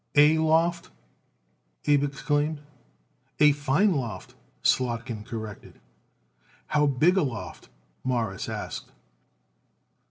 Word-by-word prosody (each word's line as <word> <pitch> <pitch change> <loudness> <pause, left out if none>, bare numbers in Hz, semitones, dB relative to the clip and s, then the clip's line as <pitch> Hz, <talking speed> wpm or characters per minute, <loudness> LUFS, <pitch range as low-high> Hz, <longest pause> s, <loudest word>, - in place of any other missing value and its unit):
"A 150 +2 +7
loft!" 165 +2 +2 1.0
Abe 145 -1 +4
exclaimed. 145 +1 -1 0.8
"A 150 -1 +7
fine 145 +8 +2
loft," 115 - -4 0.3
Slotkin 120 -3 0
corrected. 110 -2 -8 0.9
"How 150 0 +2
big 155 +8 +3
a - - +4
loft?" 115 - -5 0.3
Morris 115 -7 -2
asked. - - -6
145 Hz, 90 wpm, -26 LUFS, 120-155 Hz, 1.0 s, A